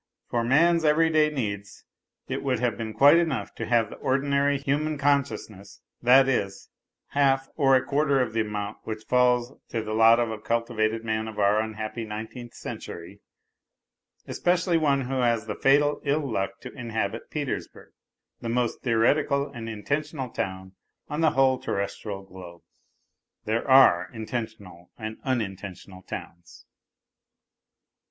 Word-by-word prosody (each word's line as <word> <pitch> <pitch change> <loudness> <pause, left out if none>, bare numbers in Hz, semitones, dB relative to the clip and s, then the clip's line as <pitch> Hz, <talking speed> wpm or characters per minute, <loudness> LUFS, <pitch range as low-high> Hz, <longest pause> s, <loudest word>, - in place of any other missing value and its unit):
For 120 -1 +1
man's 165 +7 +4
everyday 155 0 +4
needs, 100 -8 -5 0.4
it - - -3
would - - 0
have - - 0
been 110 -1 -5
quite 140 +8 +6
enough 155 -12 -1
to - - -5
have 115 -3 +2
the - - -9
ordinary 140 +1 +1
human 145 +3 -1
consciousness, 140 -8 -1 0.2
that 130 +2 +6
is, 100 -7 -2 0.4
half 135 -1 +2
or 135 -3 +4
a 130 - +3
quarter 140 -1 +2
of 125 -4 -1
the 115 - +1
amount 105 -1 -4
which 110 -1 -6
falls 125 0 +2 0.2
to 115 -2 -2
the 110 0 -4
lot 115 +1 +6
of 120 -2 0
a 110 - -5
cultivated 115 0 -1
man 110 0 -1
of 110 - -8
our 105 +1 +3
unhappy 110 +1 -4
nineteenth 110 +3 -7
century, 90 +4 -8 1.1
especially 175 0 +1
one 145 -4 +2
who 130 +1 -2
has 115 -3 +1
the 105 - -3
fatal 145 +4 +3
ill 145 0 0
luck 100 -4 -3
to 125 - -9
inhabit 115 -3 -4
Petersburg, 145 -3 -5 0.5
the 115 - -5
most 120 0 -1
theoretical 140 +4 +2
and 115 -1 -6
intentional 135 +5 -3
town 95 -1 -4 0.4
on 150 +2 -2
the 160 - +5
whole 130 -1 +3
terrestial 100 0 -4
globe. 90 -3 -12 0.8
(There 110 +4 -1
are 130 -10 +6
intentional 110 -6 -6
and 110 -1 -6
unintentional 100 -6 -4
towns.) 85 -1 -10
120 Hz, 145 wpm, -26 LUFS, 110-140 Hz, 1.1 s, quite